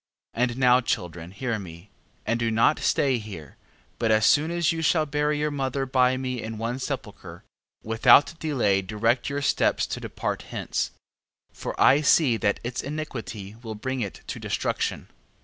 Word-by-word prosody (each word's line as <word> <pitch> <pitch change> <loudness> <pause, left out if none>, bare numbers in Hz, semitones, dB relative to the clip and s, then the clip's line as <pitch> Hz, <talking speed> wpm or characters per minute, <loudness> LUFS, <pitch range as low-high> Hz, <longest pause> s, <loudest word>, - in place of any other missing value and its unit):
14:12. 115 - -2
And 120 -1 -1
now, 125 -1 +5
children, 90 -7 -3
hear 115 +3 -3
me, 85 +1 -11 0.3
and 115 +1 0
do 115 -1 +1
not 115 +7 +3
stay 135 -4 +2
here: 95 -10 -9 0.4
but 115 - +1
as 110 0 +4
soon 150 +7 +4
as 170 0 +1
you 165 0 -3
shall 160 0 +2
bury 150 0 0
your 150 0 -1
mother 135 -1 -2
by 130 -1 +2
me 130 -2 -3
in 110 0 -6
one 115 +3 -3
sepulchre, 130 -6 -6 0.4
without 115 +7 +5
delay 120 -11 +1
direct 115 +6 0
your 140 0 -3
steps - - +2
to - - -5
depart - - -4
hence: - - -2 0.6
14:13. - - -24
For - - -5
I 140 +3 +6
see 145 -4 +4
that 100 -2 0
its 120 +1 -3
iniquity 120 -9 -6
will 110 -3 -6
bring 130 +4 -3
it 100 -4 -5
to - - -6
destruction. - - -2
125 Hz, 175 wpm, -25 LUFS, 110-140 Hz, 0.6 s, I